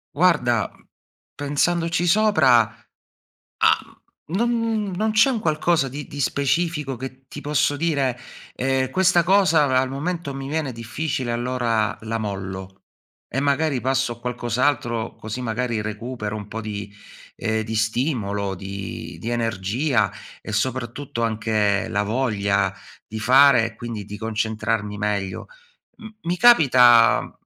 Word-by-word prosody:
Guarda, 135 - +2
mhmm, - - -25 0.5
pensandoci 165 +4 0
sopra, 205 - +5 0.8
uhm, 165 - -2
non 235 +1 +2
n 225 -3 -1
non 215 +2 +1
c'è 225 +5 +5
un 235 -4 -1
qualcosa 155 -3 +1
di 145 +2 -7
di 145 - -8
specifico 140 0 0
che 130 +1 -8
ti 145 - -7
posso 145 -1 0
dire: 140 -6 0 0.3
"Ehm, 130 0 0
questa 180 +2 +3
cosa 180 -5 +4
a 130 -2 +3
al 130 - +1
momento 150 +1 -3
mi 135 0 -6
viene 150 -5 -2
difficile, 125 +2 -3
allora 120 -3 0
la 115 +1 -3
mollo 95 -2 -6 0.5
e 135 - -2
magari 140 -1 +1
passo 130 0 0
a - - -17
qualcos'altro 120 -1 -1
così 110 +3 -6
magari 115 -1 -2
recupero 110 0 -5
un 105 -1 -7
po' 110 - -5
di 105 -2 -6 0.4
ehm, 110 0 -1
di 110 +1 -5
stimolo, 110 -3 -1
di 95 +1 -7
di 115 - -4
energia 115 0 0 0.3
e, 110 - -7
soprattutto, 120 +2 -2
anche 110 -1 0
la 105 -2 0
voglia 100 -4 0 0.3
di 110 - -6
fare 130 0 +6
e 115 - -12
quindi 115 -3 -6
di 105 +1 -8
concentrarmi 110 -1 -2
meglio." 100 -2 -2 0.5
M 220 - -9 0.2
mi 175 +1 -1
capita 125 - +6
125 Hz, 135 wpm, -22 LUFS, 110-145 Hz, 0.8 s, fare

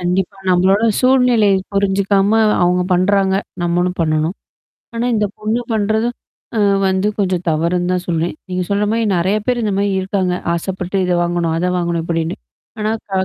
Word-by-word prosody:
கண்டிப்பா. 180 +2 -1
நம்மளோட 190 +3 +3 0.2
சூழ்நிலை 250 -5 +4 0.2
புரிஞ்சுக்காம 200 +2 +2 0.2
அவங்க 180 +1 +2
பண்றாங்க. 190 +1 +2 0.3
நம்மளும் 175 +1 0
பண்ணணும். 155 +2 0 0.6
ஆனா 230 +1 -1
இந்த 210 -1 +1
பொண்ணு 215 +3 -1
பண்றது. 220 +2 +1 0.5
ஆ - - +2 0.3
வந்து 190 +2 +1
கொஞ்சம் 185 -3 0
தவறுன்னு 175 +3 0
தான் 180 0 -1
சொல்றேன். 165 -1 -1
நீங்க 185 0 -2
சொல்ற 200 +1 +1
மாரி 230 0 +1
நெறைய 185 +4 +1
பேர் 245 -2 0
இந்த 210 - 0
மாரி 200 0 +1
இருக்காங்க. 190 -1 -1 0.2
ஆசைப்பட்டு 185 +2 -3
இத 180 - +1
வாங்கணும். 170 -1 -1
அத 180 +2 0
வாங்கணும் 170 -1 -1
இப்படின்னு. 165 0 -2 0.4
ஆனா 215 +1 0 0.2
க - - -26
190 Hz, 155 wpm, -17 LUFS, 175-205 Hz, 0.6 s, சூழ்நிலை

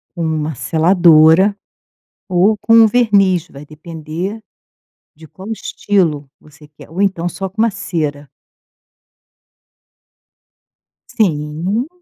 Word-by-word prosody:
com 170 - -4
uma 155 -1 -2
seladora 165 - +4 0.7
ou 190 +4 +2
com 225 - +1
um 230 -1 +7
verniz, 200 -7 +2
vai 140 +1 -12
depender 160 +6 -7 0.7
de 160 +1 -15
qual 190 +7 -11
estilo 170 -10 -2
você 150 0 -19
quer. 150 - -17
Ou 175 +6 -3
então, 180 -3 -1
só 190 +2 -6
com 200 +4 -7
uma 230 - +2
cera. 150 -7 -5 2.8
Sim. 175 - -2
175 Hz, 105 wpm, -16 LUFS, 155-200 Hz, 2.8 s, um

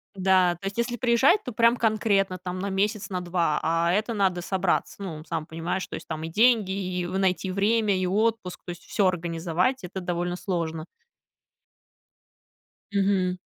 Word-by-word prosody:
Да, 185 -2 +3
то 175 - -11
есть, 195 +2 -4
если 240 +1 -1
приезжать, 255 - +4
то 250 - -5
прям 230 +2 +4
конкретно 210 -4 +1
там 180 0 -5
на 200 +2 -2
месяц, 200 +1 -1
на 185 -2 -2
2, 170 -3 0
а, 165 +1 +2
это 215 +4 0
надо 190 -4 +1
собраться. 190 +2 -1
Ну, 160 -6 -6
сам 155 - -4
понимаешь, 165 +4 -3
то - - -6
есть, - - -9
там 160 -1 -4
и - - -3
деньги, 215 +2 +3
и 185 -2 -2
в 185 +2 -3
найти 190 0 +1
время, 205 +1 +2
и 185 - 0
отпуск, 215 -1 0
то 175 - -5
есть, 175 0 -10
всё 200 - +1
организовать, 175 +6 -1
это 190 +2 -6
довольно 175 0 -2
сложно. 165 -4 -3 2.1
Мгм. 195 -2 +1
185 Hz, 175 wpm, -26 LUFS, 175-210 Hz, 2.1 s, приезжать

